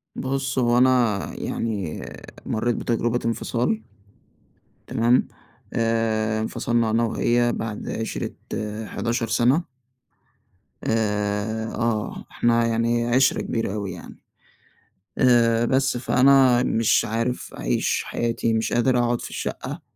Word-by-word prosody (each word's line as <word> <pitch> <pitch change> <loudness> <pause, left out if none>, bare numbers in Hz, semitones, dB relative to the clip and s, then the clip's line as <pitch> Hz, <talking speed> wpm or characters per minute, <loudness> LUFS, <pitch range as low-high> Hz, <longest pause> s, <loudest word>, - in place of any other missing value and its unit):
بُص، 135 0 -2
هو 120 -1 +3
أنا 125 -5 +3
يعني 100 -8 -3 0.4
مريت 120 +2 0
بتجربة 120 +1 0
انفصال. 115 -1 -1 1.1
تمام؟ 120 0 +2 0.5
آآ، 110 -2 0
انفصلنا 115 +1 0
أنا 115 +2 +2
وهي 120 +1 +1
بعد 110 -2 -5
عِشرِة 110 - -4 0.5
11 115 +1 -2
سنة. 125 +9 +2 1.2
آآ، 105 0 -1
آه، 115 -3 -2
إحنا 115 0 +2
يعني 115 +1 +1
عِشرة 130 +2 +3
كبيرة 115 -4 -2
أوي 100 -2 -3
يعني. 85 - -11 1.0
آآ، 120 -2 +4
بس 135 +1 +1
فأنا 130 0 +4
مش 115 -3 +2
عارف 115 +3 -3
أعيش - - 0
حياتي، 115 -1 -1
مش 110 0 0
قادر 125 +1 +2
أقعد 120 0 +1
في - - -7
الشقة، - - -5
115 Hz, 110 wpm, -23 LUFS, 110-120 Hz, 1.2 s, آآ